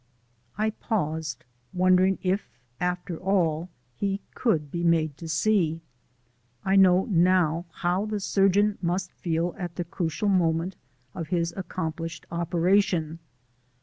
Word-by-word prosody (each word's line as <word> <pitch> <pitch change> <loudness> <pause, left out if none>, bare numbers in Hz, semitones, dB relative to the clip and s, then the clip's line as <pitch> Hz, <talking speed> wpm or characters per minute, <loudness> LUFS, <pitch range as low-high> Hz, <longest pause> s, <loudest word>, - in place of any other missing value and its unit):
I 215 +1 +1
paused, 160 - -3 0.3
wondering 185 +1 +4
if, 190 +2 0 0.3
after 180 -1 -2
all, 175 -3 +1 0.3
he 195 +7 -1
could 155 - 0
be 170 0 -3
made 160 -3 +2
to 165 - -8
see. 165 -1 +2 0.9
I 190 - +3
know 190 -1 +6
now 175 -3 +3
how 180 +5 -1
the 210 -1 -2
surgeon 200 +1 +2
must 180 +1 -1
feel 170 0 -1
at 175 -2 -5
the 175 - -2
crucial 175 +3 -2
moment 175 -1 +1 0.4
of 165 -3 -5
his 170 0 0
accomplished 165 -3 -4
operation. 170 -1 +1
180 Hz, 120 wpm, -26 LUFS, 165-195 Hz, 0.9 s, know